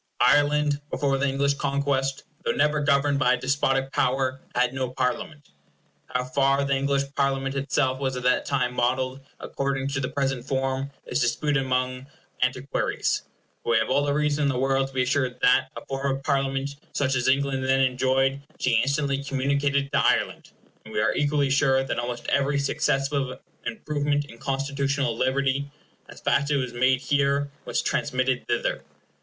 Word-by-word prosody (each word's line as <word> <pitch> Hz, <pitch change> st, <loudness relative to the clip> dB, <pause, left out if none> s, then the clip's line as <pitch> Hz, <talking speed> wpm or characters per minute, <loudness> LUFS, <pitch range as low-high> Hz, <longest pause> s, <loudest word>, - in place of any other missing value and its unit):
Ireland, 145 Hz, 0 st, +3 dB
before 135 Hz, -1 st, 0 dB
the 140 Hz, -, +1 dB
English 140 Hz, +1 st, +1 dB
conquest, 140 Hz, -1 st, -1 dB, 0.2 s
though -, -, +1 dB
never 150 Hz, 0 st, +2 dB
governed 140 Hz, 0 st, +2 dB
by 125 Hz, -2 st, +4 dB
a -, -, +1 dB
despotic 135 Hz, +1 st, 0 dB
power, 130 Hz, +1 st, 0 dB
had 125 Hz, 0 st, +2 dB
no 130 Hz, -1 st, -2 dB
Parliament. 130 Hz, +3 st, -3 dB, 0.6 s
How 125 Hz, 0 st, -1 dB
far 135 Hz, +2 st, +2 dB
the 140 Hz, 0 st, +1 dB
English 140 Hz, 0 st, +1 dB
Parliament 135 Hz, -1 st, 0 dB
itself 135 Hz, -1 st, 0 dB
was 130 Hz, -2 st, -1 dB
at 125 Hz, -, -5 dB
that 125 Hz, 0 st, +2 dB
time 130 Hz, -3 st, 0 dB
modelled 130 Hz, +2 st, 0 dB, 0.2 s
according 135 Hz, 0 st, -2 dB
to 135 Hz, -1 st, -2 dB
the 130 Hz, -, -2 dB
present 135 Hz, -3 st, -1 dB
form 135 Hz, +1 st, -1 dB, 0.2 s
is -, -, -1 dB
disputed 135 Hz, +4 st, +1 dB
among 130 Hz, 0 st, -1 dB, 0.3 s
antiquaries; 130 Hz, +1 st, 0 dB, 0.4 s
but -, -, -4 dB
we 115 Hz, -, +4 dB
have 110 Hz, +2 st, 0 dB
all 145 Hz, -, +3 dB
the 145 Hz, 0 st, 0 dB
reason 150 Hz, 0 st, +1 dB
in -, -, +3 dB
the 130 Hz, -, -1 dB
world 135 Hz, +1 st, +1 dB
to 135 Hz, -, -15 dB
be 130 Hz, -, +2 dB
assured 125 Hz, -1 st, 0 dB
that 125 Hz, -, +5 dB
a -, -, -8 dB
form 135 Hz, 0 st, -1 dB
of 135 Hz, -, -13 dB
Parliament 135 Hz, +1 st, -1 dB, 0.2 s
such 135 Hz, -1 st, +1 dB
as 125 Hz, -2 st, 0 dB
England 135 Hz, 0 st, +1 dB
then 135 Hz, 0 st, +3 dB
enjoyed 130 Hz, +1 st, +1 dB, 0.2 s
she 115 Hz, -3 st, +3 dB
instantly 140 Hz, 0 st, 0 dB
communicated 140 Hz, 0 st, 0 dB
to -, -, +2 dB
Ireland, -, -, +1 dB, 0.3 s
and -, -, -11 dB
we -, -, +1 dB
are 110 Hz, 0 st, +2 dB
equally 145 Hz, -1 st, +1 dB
sure 135 Hz, -1 st, +3 dB
that 135 Hz, -, -2 dB
almost 120 Hz, 0 st, -4 dB
every 140 Hz, +1 st, +2 dB
successive 140 Hz, -2 st, 0 dB, 0.3 s
improvement 145 Hz, -8 st, -1 dB
in 115 Hz, -4 st, -14 dB
constitutional 140 Hz, -2 st, -1 dB
liberty, 135 Hz, +2 st, 0 dB, 0.4 s
as -, -, -11 dB
fast 140 Hz, -, +2 dB
as -, -, -5 dB
it 145 Hz, -, +2 dB
was 125 Hz, -2 st, -3 dB
made 130 Hz, +1 st, +2 dB
here, 140 Hz, 0 st, +1 dB
was -, -, -1 dB
transmitted 130 Hz, -2 st, 0 dB
thither. -, -, -1 dB
135 Hz, 175 wpm, -25 LUFS, 130-140 Hz, 0.6 s, that